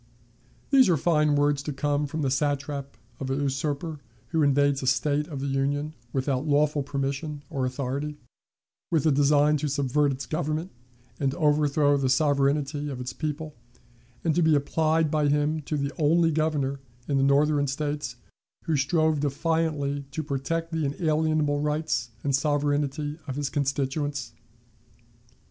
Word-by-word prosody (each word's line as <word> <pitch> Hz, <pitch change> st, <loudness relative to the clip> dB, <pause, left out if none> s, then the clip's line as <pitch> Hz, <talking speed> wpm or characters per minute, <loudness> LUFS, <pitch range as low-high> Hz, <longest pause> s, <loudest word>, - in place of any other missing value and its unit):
These 265 Hz, -6 st, +6 dB
are 170 Hz, -, +4 dB
fine 150 Hz, -1 st, +2 dB
words 145 Hz, -1 st, +2 dB
to 150 Hz, -, -4 dB
come 145 Hz, +1 st, 0 dB
from 155 Hz, +2 st, -3 dB
the 135 Hz, -, +1 dB
satrap 140 Hz, 0 st, -2 dB, 0.2 s
of 135 Hz, -, -4 dB
a 135 Hz, -, 0 dB
usurper 145 Hz, +3 st, -2 dB, 0.3 s
who 160 Hz, -2 st, +1 dB
invades 140 Hz, -1 st, +3 dB
a 130 Hz, -, -3 dB
State 145 Hz, +3 st, +1 dB
of 140 Hz, -5 st, -6 dB
the -, -, -2 dB
Union 140 Hz, +2 st, -1 dB, 0.2 s
without 135 Hz, +2 st, -1 dB
lawful 150 Hz, 0 st, +2 dB
permission 140 Hz, +2 st, -3 dB
or 135 Hz, -4 st, -1 dB
authority, 140 Hz, +3 st, -3 dB, 0.7 s
with 160 Hz, -4 st, +2 dB
the 155 Hz, -, +4 dB
design 145 Hz, +2 st, +4 dB
to 150 Hz, +1 st, -2 dB
subvert 140 Hz, +1 st, +1 dB
its 135 Hz, 0 st, -5 dB
government 155 Hz, +4 st, -2 dB, 0.5 s
and 140 Hz, -1 st, 0 dB
overthrow 150 Hz, -2 st, +3 dB
the 135 Hz, -2 st, 0 dB
sovereignty 145 Hz, +1 st, +1 dB
of 130 Hz, -3 st, -5 dB
its 125 Hz, 0 st, -5 dB
people, 155 Hz, +1 st, -4 dB, 0.7 s
and 165 Hz, -, +2 dB
to 175 Hz, -, +2 dB
be 160 Hz, -2 st, +4 dB
applied 155 Hz, +2 st, +1 dB
by 150 Hz, -2 st, +2 dB
him 150 Hz, +2 st, +1 dB
to 150 Hz, -, -2 dB
the 140 Hz, 0 st, -1 dB
only 165 Hz, +2 st, +4 dB
Governor 145 Hz, -3 st, 0 dB, 0.3 s
in 140 Hz, -, +1 dB
the 135 Hz, -, +3 dB
Northern 145 Hz, +1 st, +3 dB
States 145 Hz, -1 st, -3 dB, 0.5 s
who 160 Hz, -, 0 dB
strove 155 Hz, +2 st, +2 dB
defiantly 145 Hz, -1 st, -1 dB
to 155 Hz, +3 st, -4 dB
protect 155 Hz, +4 st, -2 dB
the 160 Hz, -1 st, -1 dB
unalienable 155 Hz, -1 st, +1 dB
rights 150 Hz, -4 st, -1 dB
and 140 Hz, -2 st, +2 dB
sovereignty 145 Hz, +1 st, 0 dB
of 135 Hz, -, -4 dB
his 145 Hz, -1 st, -2 dB
constituents! 140 Hz, -2 st, -2 dB
145 Hz, 155 wpm, -26 LUFS, 140-155 Hz, 0.7 s, These